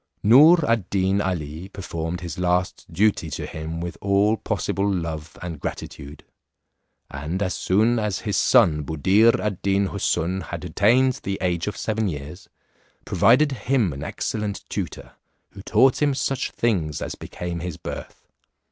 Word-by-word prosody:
Noor 150 - +7
ad 115 -5 +1
Deen 95 +1 +1
Ali, 85 -1 -4
performed 85 -3 -5
his 90 0 -6
last 90 0 0
duty 95 -2 +1
to - - -5
him 80 +1 -6
with 85 0 -6
all 100 +2 +3
possible 100 -1 -1
love 80 -4 -4
and 85 -4 -6
gratitude. 70 +1 -7 0.9
And 75 +7 -4
as 90 -2 -1
soon 110 +5 +2
as 105 -3 -2
his 105 - -2
son 90 -12 +4
Buddir 95 +10 +3
ad 105 -4 -3
Deen 100 0 +1
Houssun 95 -1 -1
had 85 0 -6
attained 120 +9 +3
the 100 0 -3
age 90 -1 -1
of 105 - -3
seven 110 -1 -1
years, 75 +3 -7 0.6
provided 145 +3 +4
him 120 - 0
an 70 - -8
excellent 105 -2 -4
tutor, - - -5 0.4
who 100 - -11
taught 130 +7 +3
him 145 -2 +2
such 135 0 -1
things 85 - -1
as - - -4
became 85 -1 -6
his 85 -2 -5
birth. - - -8
95 Hz, 150 wpm, -23 LUFS, 85-110 Hz, 0.9 s, Noor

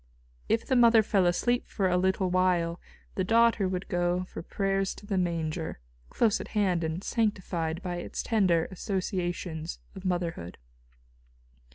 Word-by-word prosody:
If 225 - +1
the 260 - +1
mother 230 -2 +6
fell 195 -4 +2
asleep 240 +8 +1
for 195 -3 0
a 180 - +2
little 190 0 +1
while, 180 -2 +1 0.3
the 190 - -1
daughter 230 -1 +3
would 185 0 -3
go 175 0 0
for 185 - -8
prayers 195 +2 -1
to - - -13
the 205 -1 -2
Manger, 165 - -2 0.3
close 220 -3 +2
at - - -7
hand 185 -5 +2
and 160 +4 -3
sanctified 185 -7 -1
by 175 -2 -3
its 175 - -5
tender 185 -8 +2
associations 175 -3 -3 0.2
of 190 - -10
motherhood. 175 - -2
185 Hz, 150 wpm, -28 LUFS, 175-200 Hz, 0.3 s, mother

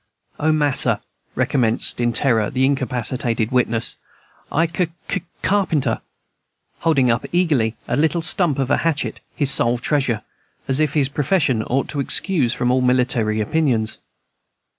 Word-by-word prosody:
"O 155 +1 +2
mas'r," 145 -3 +2 0.4
recommenced 120 -1 +1
in 120 0 +2
terror 115 -4 +1
the 130 0 +1
incapacitated 125 -3 -1
wit 125 -1 +2
ness, 115 0 -1 0.6
"I 165 +3 +2
c 165 +1 -1 0.2
c - - -2 0.2
carpenter!" 155 - +1 0.8
holding 140 -7 +2
up 115 - -1
eagerly 145 -11 +1
a - - 0
little 160 +2 +1
stump 165 -3 +2
of 135 0 -1
a - - +4
hatchet, 165 -3 -2 0.2
his 140 -2 +4
sole 120 -2 +4
treasure, 125 -3 -1 0.4
as 135 +1 +2
if 155 -2 0
his 140 -3 +3
profession 140 - 0
ought 130 +5 -1
to 145 - -3
excuse 140 - +1
from 125 +1 0
all 130 0 +2
military 125 -4 +1
opinions. 115 -3 0
130 Hz, 145 wpm, -20 LUFS, 120-155 Hz, 0.8 s, a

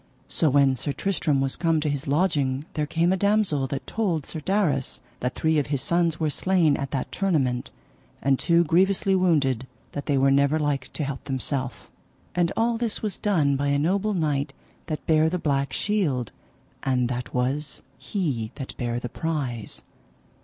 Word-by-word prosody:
So 160 - +2
when 140 -1 +4
Sir 140 +3 -3
Tristram 155 -8 0
was 135 -1 0
come 165 -2 +1
to 150 - -1
his 145 -2 -2
lodging 145 -3 +1
there 150 -2 -1
came 170 +4 +2
a - - +3
damosel 200 -9 +2
that 135 +1 -4
told 180 -10 -1
Sir 160 - -5
Darras 155 -6 0 0.2
that 125 +1 -2
three 160 -1 +2
of 145 - -1
his 140 -2 0
sons 170 0 +1
were 155 -2 +1
slain 175 -4 +3
at 140 -1 -3
that 130 0 -3
tournament, 135 -11 0 0.5
and 135 -1 +2
two 170 0 +4
grievously 190 +4 +2
wounded 145 -9 +2 0.2
that 145 - -6
they 145 - +2
were 135 +1 +4
never 140 +2 +3
like 145 -3 -1
to 155 - -2
help 135 -2 -5
themself. 135 -1 -3 0.5
And 175 -1 +1
all 230 0 +1
this 230 -2 -1
was 210 -2 -2
done 155 -9 +2
by 140 +1 0
a 140 0 +2
noble 195 +7 +1
knight 145 -4 0 0.3
that 155 -2 -4
bare 155 0 +4
the 180 - -1
black 140 -5 0
shield, 145 - 0 0.5
and 125 -2 +1
that 125 0 -4
was 135 +4 -1 0.2
he 140 - -2
that 135 -2 -7
bare 120 -1 -2
the 125 - -4
prize. 130 -6 -4
145 Hz, 180 wpm, -25 LUFS, 135-170 Hz, 0.5 s, when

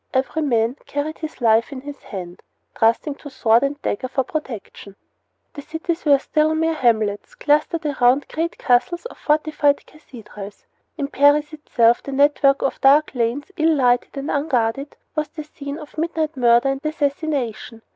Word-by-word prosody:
Every 265 +4 0
man 240 -3 +1
carried 295 +2 -3
his 315 -4 -7
life 225 +1 +3
in 265 -2 -7
his 285 +1 -9
hand, 180 -3 -8 0.4
trusting 230 +6 +2
to 290 - -10
sword 235 -3 +3
and 280 +1 -2
dagger 255 +6 -2
for 265 +1 -1
protection. 235 -8 -7 0.6
The 290 - -8
cities 325 +3 -4
were 285 -2 +6
still 310 +3 +1
mere 325 +1 +1
hamlets 220 -7 0
clustered 300 +2 +1
around 270 -1 +2
great 330 +2 -3
castles 280 - +1
or - - -13
fortified 300 -1 +1
cathedrals. 210 -8 -12 0.3
In 285 -3 -2
Paris 290 +2 +3
itself 240 -6 +2
the 275 - -7
network 280 0 +3
of 270 - -2
dark 290 +3 +5
lanes, 245 +7 -2
ill 320 0 +3
lighted 245 0 +1
and 275 +2 -3
unguarded, 275 -1 -1 0.2
was 305 -1 -1
the 310 -2 -8
scene 285 -1 -8
of 300 -2 -11
midnight 320 -2 -1
murder 240 +1 +4
and 270 0 -2
assassination. 285 -7 -2
280 Hz, 160 wpm, -21 LUFS, 245-305 Hz, 0.6 s, were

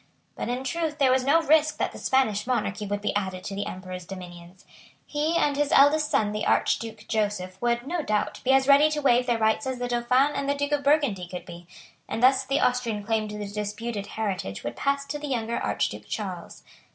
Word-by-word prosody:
But - - -4
in 250 +2 -2
truth 315 +2 -2
there 270 -3 +4
was 260 0 +3
no 325 +4 +4
risk 310 0 +3
that - - -1
the - - -10
Spanish 230 -5 +1
monarchy 210 -4 -1
would 205 0 -2
be 210 - -2
added 190 -2 -2
to 195 - -5
the 200 +1 -3
Emperor's 185 -1 -7
dominions. 175 0 -11 0.4
He 305 +3 0
and 290 -3 +2
his 290 0 0
eldest 295 +2 +5
son 210 -6 +1
the 210 0 -3
Archduke 225 -1 0
Joseph 200 -4 -2
would, 240 0 0
no 340 +3 -2
doubt, 215 -7 -1
be 260 - -3
as 270 0 +4
ready 285 +2 +6
to 305 -1 -2
waive 250 -3 +3
their 240 -1 +2
rights 220 +5 +1
as 260 -1 -2
the 245 0 -3
Dauphin 250 +4 +2
and 280 - -2
the 285 - +2
Duke 285 +1 -2
of 290 -1 +1
Burgundy 275 - +2
could 180 0 -7
be; 175 -1 -11 0.4
and 225 - -3
thus 265 +1 +5
the 275 +2 0
Austrian 235 -4 0
claim 220 0 0
to 210 0 -7
the 210 - -4
disputed 210 +1 -4
heritage 185 - -4
would 120 0 -4
pass 280 - 0
to 295 +1 -5
the 295 - -5
younger 235 -3 -2
Archduke - - -2
Charles. - - -6
240 Hz, 220 wpm, -26 LUFS, 205-280 Hz, 0.4 s, ready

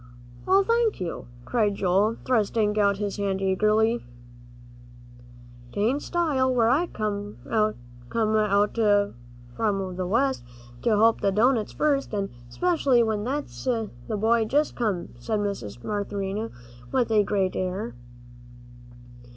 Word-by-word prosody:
"Oh, 390 +1 +5
thank 465 +1 +1
you," 175 -8 -5 0.2
cried 215 -4 +1
Joel, 200 +4 +2
thrusting 215 -3 +1
out 200 -1 +3
his 205 0 -3
hand 195 -1 -1
eagerly. 215 +4 +2 1.7
"'Tain't 235 +8 +1
style, 295 -7 +1
where 235 -3 +3
I 305 +8 +2
come 205 -3 -4
from 215 - -1
out 210 0 +2
West, 195 - 0 0.4
to - - +1
help 225 +1 +4
the 195 - +2
doughnuts 225 +2 +2
first, 280 -6 0
an' 200 -1 -2 0.2
specially 280 - +2
when 215 -2 -1
that 285 +3 -1 0.6
boy's 220 +1 +2
just 295 +2 +1
come," 205 -7 -1
said 215 - -1
Mrs. 120 - -4
Marinthy, 205 +1 -3 0.4
with 245 -3 +1
a 215 -1 +5
great 195 -2 0
air. 185 - -3
210 Hz, 115 wpm, -25 LUFS, 195-235 Hz, 1.7 s, Oh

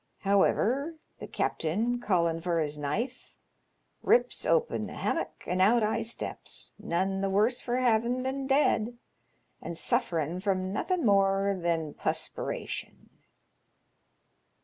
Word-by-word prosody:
However, 240 +9 +2 0.2
the - - -7
capt'n, 220 +10 -1
callin' 170 -6 +1
for 170 -1 0
his 150 -1 -2
knife, 225 - -3 0.7
rips 470 +3 +2
open 480 -1 +1
the - - -9
hammock, - - -2
an' 185 +1 0
out 225 +4 +5
I 220 +2 +1
steps, 230 +1 -4
none 195 0 -1
th' 195 - 0
worse 215 +6 +2
for 240 - -2
bavin' 245 0 +2
been 265 +1 -2
dead, 245 -4 +2 0.6
and 170 - -6
sufferin' 175 - 0
from 190 -1 -1
nothin' 360 - 0
more 195 -1 +3
than 170 -4 -1
pusperation." - - -4
200 Hz, 120 wpm, -29 LUFS, 180-245 Hz, 0.7 s, out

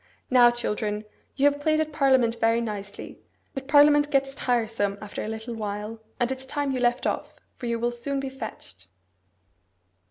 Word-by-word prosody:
Now, 245 -1 +7
children, 210 -3 -2 0.3
you 275 - +2
have 285 0 +3
played 310 +1 +2
at 310 -1 -1
parliament 260 -5 +3
very 230 +1 +3
nicely; 205 -3 -6 0.3
but 270 0 -6
parliament 290 0 +6
gets 275 -1 +1
tiresome 225 -6 0
after 210 -1 -6
a - - -4
little 220 +2 -5
while, 210 0 -5 0.2
and 240 +1 +1
it's 265 0 -5
time 285 0 -1
you 260 - -1
left 240 0 +1
off, - - -2 0.2
for 245 - -6
you 235 0 0
will 240 +1 0
soon 255 +4 -3
be 270 - -3
fetched. 95 - -9
240 Hz, 170 wpm, -26 LUFS, 220-275 Hz, 0.3 s, Now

